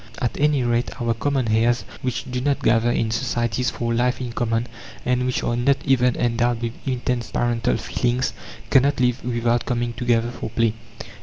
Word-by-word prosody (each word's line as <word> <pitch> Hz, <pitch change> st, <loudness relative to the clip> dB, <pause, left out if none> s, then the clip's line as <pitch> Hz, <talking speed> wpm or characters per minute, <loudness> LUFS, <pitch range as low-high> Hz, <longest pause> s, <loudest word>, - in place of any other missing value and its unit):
At 125 Hz, -4 st, -1 dB
any 145 Hz, -2 st, +3 dB
rate, 120 Hz, +2 st, -1 dB
our 120 Hz, -1 st, +1 dB
common 130 Hz, +3 st, 0 dB
hares, 115 Hz, +2 st, +2 dB, 0.2 s
which 125 Hz, -2 st, -2 dB
do 125 Hz, 0 st, -2 dB
not 140 Hz, +1 st, 0 dB
gather 115 Hz, +1 st, +3 dB
in 115 Hz, -2 st, 0 dB
societies 120 Hz, +1 st, 0 dB
for 115 Hz, -3 st, -2 dB
life 125 Hz, +2 st, +1 dB
in 125 Hz, -2 st, -4 dB
common, 115 Hz, -1 st, 0 dB, 0.4 s
and 125 Hz, 0 st, +1 dB
which 125 Hz, -, -1 dB
are 120 Hz, -, 0 dB
not 130 Hz, +3 st, +3 dB
even 125 Hz, -2 st, +3 dB
endowed 120 Hz, 0 st, 0 dB
with 115 Hz, -1 st, -2 dB
intense 125 Hz, -2 st, -1 dB
parental 115 Hz, -, 0 dB
feelings, 125 Hz, +2 st, -1 dB, 0.4 s
cannot 140 Hz, +1 st, +4 dB
live 125 Hz, 0 st, +1 dB
without 120 Hz, -1 st, 0 dB
coming 120 Hz, -1 st, -1 dB
together 120 Hz, -1 st, +1 dB
for 120 Hz, -, -6 dB
play. 115 Hz, 0 st, +1 dB
120 Hz, 175 wpm, -22 LUFS, 115-125 Hz, 0.4 s, cannot